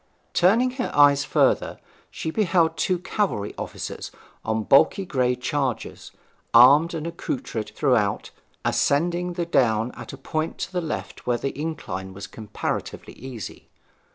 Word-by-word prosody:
Turning 225 Hz, +8 st, +4 dB
her 250 Hz, 0 st, -3 dB
eyes 145 Hz, -1 st, +6 dB
further -, -, +1 dB, 0.3 s
she 160 Hz, -, -4 dB
beheld 170 Hz, -5 st, +2 dB
two 180 Hz, +3 st, +1 dB
cavalry 180 Hz, -, -2 dB
soldiers -, -, -6 dB, 0.3 s
on 110 Hz, 0 st, -1 dB
bulky 140 Hz, -, +4 dB
grey 125 Hz, -6 st, +1 dB
chargers, 130 Hz, 0 st, -3 dB, 0.5 s
armed 145 Hz, +8 st, +7 dB
and 160 Hz, -1 st, -4 dB
accoutred 130 Hz, -9 st, -4 dB
throughout, 120 Hz, -8 st, +1 dB, 0.3 s
ascending 175 Hz, +4 st, +1 dB
the 170 Hz, -1 st, -2 dB
down 115 Hz, -7 st, +2 dB
at -, -, -9 dB
a 135 Hz, -, -9 dB
point 155 Hz, +4 st, -3 dB
to -, -, -4 dB
the 180 Hz, -, 0 dB
left 160 Hz, -2 st, -6 dB
where 120 Hz, -1 st, +2 dB
the 135 Hz, +3 st, -3 dB
incline 140 Hz, -11 st, -5 dB
was 100 Hz, +1 st, -7 dB
comparatively 105 Hz, -2 st, -5 dB
easy. 125 Hz, -6 st, -9 dB
145 Hz, 135 wpm, -24 LUFS, 120-170 Hz, 0.5 s, armed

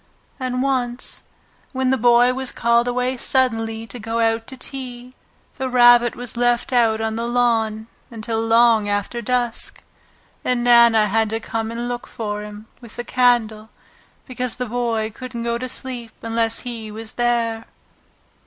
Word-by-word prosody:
And 255 Hz, 0 st, -2 dB
once, 255 Hz, -2 st, -1 dB, 0.5 s
when 260 Hz, 0 st, +1 dB
the -, -, +4 dB
Boy 245 Hz, 0 st, +4 dB
was 260 Hz, 0 st, -3 dB
called 235 Hz, +1 st, +2 dB
away 250 Hz, +1 st, -1 dB
suddenly 225 Hz, -4 st, 0 dB
to 245 Hz, +2 st, -8 dB
go 225 Hz, +1 st, -3 dB
out 225 Hz, 0 st, +1 dB
to 260 Hz, -, -8 dB
tea, 250 Hz, -2 st, -7 dB, 0.5 s
the 260 Hz, 0 st, -2 dB
Rabbit 240 Hz, -1 st, +5 dB
was 245 Hz, -1 st, -7 dB
left 240 Hz, +1 st, +1 dB
out 225 Hz, -3 st, +3 dB
on 220 Hz, 0 st, -2 dB
the 230 Hz, +1 st, -2 dB
lawn 225 Hz, -3 st, +1 dB, 0.2 s
until 225 Hz, -1 st, -3 dB
long 225 Hz, -2 st, +4 dB
after 205 Hz, +4 st, -2 dB
dusk, 240 Hz, 0 st, -1 dB, 0.6 s
and 250 Hz, -1 st, 0 dB
Nana 235 Hz, -2 st, +6 dB
had 220 Hz, +1 st, +1 dB
to 225 Hz, +1 st, -2 dB
come 225 Hz, 0 st, -4 dB
and 235 Hz, +1 st, -4 dB
look 245 Hz, 0 st, -5 dB
for 210 Hz, -2 st, -4 dB
him 210 Hz, 0 st, -9 dB, 0.2 s
with 235 Hz, -2 st, -13 dB
the 240 Hz, -, -4 dB
candle 230 Hz, -4 st, +1 dB, 0.6 s
because 250 Hz, -2 st, -2 dB
the 250 Hz, -, -3 dB
Boy 230 Hz, -2 st, -1 dB
couldn't 245 Hz, -1 st, -6 dB
go 235 Hz, 0 st, -1 dB
to 255 Hz, +1 st, -4 dB
sleep 245 Hz, -3 st, -3 dB
unless 225 Hz, 0 st, 0 dB
he 230 Hz, -3 st, -6 dB
was 220 Hz, +1 st, -7 dB
there. 235 Hz, -2 st, -1 dB
235 Hz, 160 wpm, -21 LUFS, 225-245 Hz, 0.6 s, Nana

